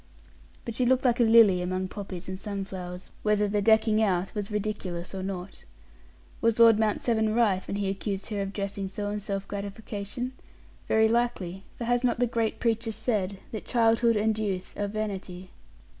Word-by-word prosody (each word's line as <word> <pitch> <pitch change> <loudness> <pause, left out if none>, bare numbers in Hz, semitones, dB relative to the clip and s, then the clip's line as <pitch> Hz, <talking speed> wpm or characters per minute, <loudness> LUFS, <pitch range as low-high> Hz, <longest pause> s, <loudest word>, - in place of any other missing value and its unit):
But 235 - -4
she 250 - 0
looked 260 +1 +3
like 245 0 +3
a - - +6
lily 220 -5 +6
among 185 +1 -2
poppies 190 -2 -7
and 185 0 -5
sunflowers 190 -3 -6
whether 210 -1 +2
the 205 0 0
"decking 220 +1 +4
out" 190 -3 +1
was 205 -2 -3
ridiculous 200 -5 -3
or 190 - -4
not. 190 0 -6 0.8
Was 230 -1 +2
Lord 230 -2 +7
Mount 215 -1 +2
Severn 220 -2 +1
right, 210 -6 +3
when - - -3
he 200 -1 -1
accused 195 +1 -3
her 205 -2 -2
of 195 0 -3
dressing 200 -1 -3
so 205 +2 -4
in 210 - -2
self 195 -1 -4
gratification? 205 +4 -5 0.6
Very 220 0 +4
likely, 220 -6 -1
for - - -4
has 245 +1 +1
not 245 -2 +2
the 245 - +4
great 230 -2 -1
preacher 225 -1 0
said 210 -3 -1
that 220 - -5
childhood 230 -1 +3
and 215 +1 +1
youth 190 -4 -3
are 205 - -1
vanity? 195 -3 -5
210 Hz, 180 wpm, -27 LUFS, 195-225 Hz, 0.8 s, Lord